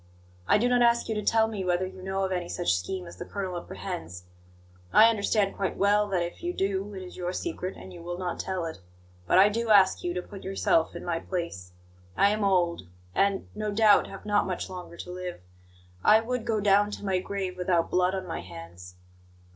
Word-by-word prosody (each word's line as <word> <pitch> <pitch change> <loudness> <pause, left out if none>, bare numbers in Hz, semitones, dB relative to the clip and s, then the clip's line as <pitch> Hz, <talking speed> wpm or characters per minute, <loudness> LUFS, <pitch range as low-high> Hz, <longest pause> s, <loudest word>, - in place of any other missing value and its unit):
I - - +5
do 235 +4 +2
not 245 0 +3
ask 235 0 +3
you - - +1
to 210 - -2
tell 220 +1 +3
me 210 -4 -4
whether 180 0 +1
you 185 0 -9
know 190 +1 -2
of 190 - -1
any 180 -2 -2
such 85 - +1
scheme 180 - -3
as 170 - -11
the - - -5
colonel 190 -1 -4
apprehends. 90 - -6 0.7
I 225 +1 +7
understand 205 -2 +1
quite 195 - -2
well 205 +1 +3
that, 185 -3 0
if 170 - -7
you 350 +1 -2
do, 195 - -2
it 190 - -6
is 180 - -10
your 180 -1 -2
secret 190 - -4
and 185 - -11
you 175 - -10
will 175 +1 -5
not 180 -1 -3
tell 185 -3 -2
it. 160 - -6 0.5
But - - +4
I 190 +2 +8
do 230 +2 -2
ask 195 -3 +5
you 175 0 -2
to 180 - -1
put 195 0 -11
yourself 190 -4 +1
in 170 - -7
my 170 -2 -1
place. 165 - -5 0.4
I 200 - +5
am 215 0 -1
old, 175 - +1 0.3
and, 200 0 +1
no 215 0 -3
doubt, 210 0 +5
have 195 - -10
not 205 -1 +2
much 185 0 -4
longer 180 -2 -8
to 180 - -7
live. 180 -1 -6 0.6
I 215 - +7
would 245 +1 -3
go 220 -2 +1
down 205 0 +4
to 205 - -7
my 190 -2 +1
grave 190 -1 -4
without 180 -2 0
blood 180 +1 +2
on 190 -1 -4
my 165 -2 -4
hands." 85 +1 -11
190 Hz, 220 wpm, -27 LUFS, 175-205 Hz, 0.7 s, I